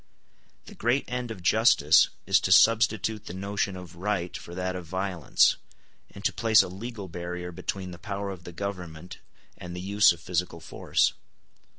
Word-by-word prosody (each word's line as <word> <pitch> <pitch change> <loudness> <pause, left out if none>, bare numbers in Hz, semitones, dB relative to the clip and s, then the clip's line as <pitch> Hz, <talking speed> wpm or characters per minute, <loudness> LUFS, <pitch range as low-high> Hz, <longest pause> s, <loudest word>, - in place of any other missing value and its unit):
The - - -12
great 120 +5 0
end 125 -1 -4
of 95 -6 -8
justice 85 -7 +5 0.2
is - - +4
to - - -2
substitute 110 -1 +4
the 90 - -6
notion 100 0 -2
of 90 -2 -11
right 95 -1 -2
for 85 - -8
that 95 0 -2
of 90 -2 -7
violence, 95 -2 +2 0.5
and 100 - -12
to - - +2
place 110 -2 +5
a - - -5
legal 105 +1 -7
barrier 90 +1 -6
between 95 +2 -5
the 85 - -10
power 100 +1 -4
of 90 -3 -9
the 85 - -9
government 90 -3 -7 0.4
and 90 -1 -8
the - - -5
use 100 +3 +4
of 85 - -6
physical 90 -1 -2
force. - - 0
95 Hz, 175 wpm, -27 LUFS, 90-105 Hz, 0.5 s, justice